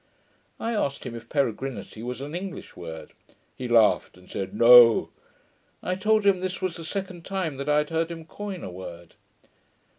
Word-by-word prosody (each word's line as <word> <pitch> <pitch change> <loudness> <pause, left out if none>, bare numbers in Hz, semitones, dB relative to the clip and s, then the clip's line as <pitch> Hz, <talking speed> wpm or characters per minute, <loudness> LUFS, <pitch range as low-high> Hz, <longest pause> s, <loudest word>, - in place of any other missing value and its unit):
I 230 - -2
asked 140 -12 -2
him 125 - -5
if 115 -1 -9
peregrinity 130 -5 -2
was 125 +2 -5
an 145 +2 -6
English 185 +1 -6
word: 80 -2 -8 0.4
he 125 - -5
laughed, 115 -6 +3
and 90 0 -18
said, 95 - -4
'No.' 120 +1 +7 0.7
I 180 - -1
told 215 +3 +2
him 195 -2 +4
this 185 0 -3
was 185 -3 -2
the 165 - -8
second 185 0 -5
time 185 -7 -3
that 140 +2 -4
I 150 - +4
had 150 +1 0
heard 165 0 0
him 165 -1 -7
coin 195 +2 -7
a - - -6
word. 85 -2 -10
150 Hz, 180 wpm, -26 LUFS, 115-185 Hz, 0.7 s, No